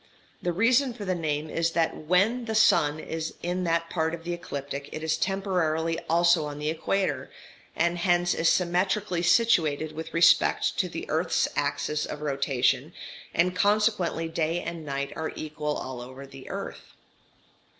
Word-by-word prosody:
The 175 - 0
reason 240 +7 +3
for 210 -4 -7
the 185 - 0
name 155 -3 -2
is 165 +1 -1
that 165 -1 +1
when 200 +10 +1
the 220 -1 -3
sun 155 -8 +4
is 160 0 -5
in 180 +1 -1
that 165 0 +1
part 160 -1 0
of 165 - -13
the 175 +1 -3
ecliptic 140 -4 -6
it 155 - -6
is 160 0 +1
temporarily 165 -5 0
also 170 -1 +4
on 145 -1 -6
the 150 +1 -1
equator, 160 -4 -1 0.5
and 170 +1 +1
hence 175 0 +2
is 165 - +2
symmetrically 180 +1 +1
situated 165 -7 +3
with 160 +1 -7
respect 170 0 +4
to - - +1
the - - -6
earth's - - +1
axis 150 0 -1
of 150 - -6
rotation, 140 -3 0 0.4
and 180 +2 +1
consequently 205 -5 +2
day 165 +1 -1
and 170 -1 -5
night 140 0 -3
are 160 0 -4
equal 150 -1 -3
all 130 -2 -6
over 130 +3 -9
the 135 -1 -12
earth. - - -7
165 Hz, 160 wpm, -27 LUFS, 150-180 Hz, 0.5 s, sun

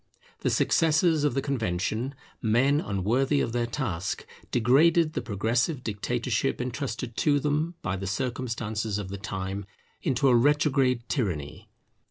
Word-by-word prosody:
The - - 0
successors 160 -1 +3
of 145 -4 +1
the 135 - 0
Convention, 115 0 -1 0.3
men 135 +6 +3
unworthy 120 +9 +1
of - - 0
their 120 0 0
task, 100 - -3 0.2
degraded 155 +7 +4
the - - -2
progressive 120 - 0
dictatorship 120 +4 -1
entrusted 125 -2 -4
to 145 -1 +3
them 150 +4 0
by 95 0 -1
the 95 +1 -5
circumstances 110 -2 -2
of 100 -3 -5
the 100 0 -6
time 95 0 -4 0.3
into 135 +1 +1
a 125 - +5
retrograde 135 -2 +3
tyranny. 90 - -3
120 Hz, 135 wpm, -27 LUFS, 105-140 Hz, 0.3 s, a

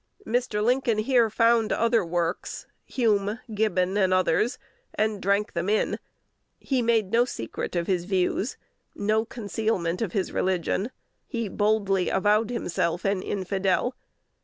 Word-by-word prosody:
Mr. 225 -3 0
Lincoln 245 -1 +2
here 230 +1 +3
found 230 0 +3
other 230 -2 +2
works, 170 0 -2 0.2
Hume, 210 -3 +1
Gibbon, 200 -3 +1
and 190 -2 +3
others, 185 +6 +2 0.4
and 215 -1 0
drank 200 +2 +1
them 170 +3 -1
in: 215 - +1 0.6
he 265 -3 -1
made 225 -4 +2
no 235 +1 +5
secret 180 - -5
of 170 -1 0
his 180 -2 0
views, 190 +4 0 0.4
no 215 +2 +1
concealment 205 -5 -2
of 210 -6 -2
his 195 -3 -1
religion. 190 +3 0 0.4
He 230 -2 -3
boldly 200 -2 +1
avowed 210 +3 +2
himself 180 -7 -1
an 195 -1 +1
infidel. 195 +5 0
205 Hz, 135 wpm, -26 LUFS, 185-225 Hz, 0.6 s, no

